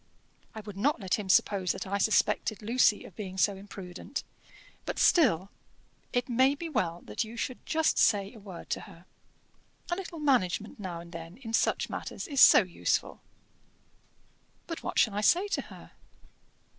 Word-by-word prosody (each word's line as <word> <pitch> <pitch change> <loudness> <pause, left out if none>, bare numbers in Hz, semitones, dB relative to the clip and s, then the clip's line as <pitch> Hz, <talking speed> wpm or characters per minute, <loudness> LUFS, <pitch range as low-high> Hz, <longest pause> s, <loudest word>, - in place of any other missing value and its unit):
I 220 - -6
would 205 -2 -10
not 280 +8 +1
let 190 0 -1
him 200 -2 -6
suppose 185 -1 +3
that - - -6
I 200 +1 -2
suspected 215 +1 +1
Lucy 225 -1 +3
of - - -13
being 190 -3 -7
so 200 +1 +2
imprudent. 190 -2 -7 0.6
But - - -4
still, 205 - +3 0.6
it 245 0 0
may 260 +3 +3
be 335 +3 -6
well 175 - -2
that 105 - -2
you 225 +2 -10
should 250 +2 -4
just 320 0 +2
say 200 0 +3
a 225 - -12
word 195 -4 -10
to - - 0
her. 170 +2 -16 0.9
A - - +2
little 355 -2 -7
management 230 - 0
now 175 -4 -5
and 170 0 -13
then, 165 +2 -9
in 230 -4 -8
such - - +1
matters, - - -6
is 280 -4 +1
so - - +9
useful." 180 -2 -2 1.4
"But 330 - -6
what - - -5
shall 220 - +4
I 205 - -1
say 355 - +4
to - - 0
her?" - - -13
210 Hz, 170 wpm, -29 LUFS, 185-255 Hz, 1.4 s, so